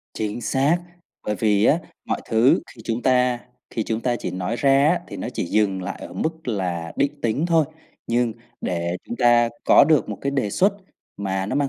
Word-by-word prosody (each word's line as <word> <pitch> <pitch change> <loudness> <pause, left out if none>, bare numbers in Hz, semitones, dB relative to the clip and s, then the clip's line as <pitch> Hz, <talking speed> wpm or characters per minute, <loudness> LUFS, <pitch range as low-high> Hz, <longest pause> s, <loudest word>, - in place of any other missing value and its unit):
Chính 110 +2 -3
xác, 135 +7 +2 0.5
bởi 105 - 0
vì 105 -1 +2
á 150 - +5 0.3
mọi - - -2
thứ 115 +3 +4
khi 115 - -14
chúng 115 +1 -2
ta 125 -1 +3 0.3
khi 110 - -2
chúng 110 +1 -2
ta 120 0 0
chỉ - - -4
nói 90 +5 -3
ra 140 +2 +4
á 175 +2 +2
thì 100 - -7
nó 95 - -4
chỉ - - -1
dừng 95 0 +1
lại 95 +2 -5
ở - - -8
mức 160 -3 -3
là 90 -6 -2
định 145 +1 0
tính 120 +9 0
thôi, 165 -2 +4 0.4
nhưng 120 0 +1 0.3
để 85 0 -2
chúng 120 - -6
ta 120 -1 +4 0.2
có - - +7
được 155 -3 +3
một - - -5
cái 140 - -1
đề 135 -7 -1
xuất 195 - +3 0.4
mà 95 -1 -2
nó - - -3
mang 145 -1 +1
120 Hz, 210 wpm, -23 LUFS, 100-140 Hz, 0.5 s, có